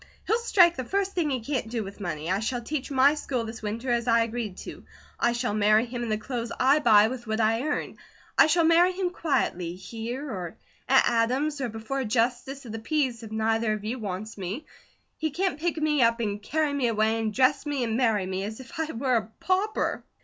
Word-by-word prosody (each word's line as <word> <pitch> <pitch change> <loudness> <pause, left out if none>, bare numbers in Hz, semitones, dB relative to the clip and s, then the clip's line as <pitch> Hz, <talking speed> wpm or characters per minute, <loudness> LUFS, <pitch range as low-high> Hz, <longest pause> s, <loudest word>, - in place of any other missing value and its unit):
He'll 450 +3 +2
strike 360 -7 +5
the 260 - -3
first 390 +8 -1
thing 335 -4 0
he 260 -3 -1
can't 250 -2 -2
do 230 -2 -2
with 195 +1 -9
money. 170 -3 -3
I 190 - +1
shall 240 +2 -2
teach 285 +2 -3
my 275 +1 +5
school 260 -6 -3
this 225 0 -7
winter 225 +4 -3
as 235 0 0
I 230 -1 +4
agreed 230 -4 -4
to. - - -9 0.4
I 240 - +3
shall 240 -2 -1
marry 215 +2 +4
him 240 0 -5
in 235 - -3
the 215 - +1
clothes 235 +1 -4
I 275 +4 +5
buy 215 -5 +6
with 240 0 -6
what 220 +1 -1
I 225 +1 +2
earn. 295 - -3 0.4
I - - +7
shall 335 +2 +3
marry 340 +3 +5
him 365 -1 -1
quietly, 250 - -1
here, 230 +8 -6
or 180 - -6 0.3
at 265 0 +5
Adam's, 260 +6 +1
or 250 - -1
before 225 +5 -4
a 265 - -1
Justice 245 +4 -1
of 230 - -7
the 225 - -5
Peace, 255 -1 -1
if 220 -2 -9
neither 220 0 +1
of 215 -1 -5
you 245 +4 -3
wants 205 +1 -5
me. 200 - -4 0.5
He 315 - -1
can't 345 0 -1
pick 335 +1 -1
me 305 -2 +1
up, 230 0 +3
and 205 -2 -2
carry 305 +5 0
me 275 -4 +1
away, 220 0 +1
and 220 -1 -1
dress 255 +6 +2
me, 285 -3 -1
and 225 -2 -1
marry 225 -6 +2
me, 190 +1 -3
as 215 +3 -6
if 295 +6 -10
I 320 0 -1
were 255 +1 +1
a 215 -1 -3
pauper." 390 +4 0
240 Hz, 230 wpm, -26 LUFS, 220-285 Hz, 0.5 s, I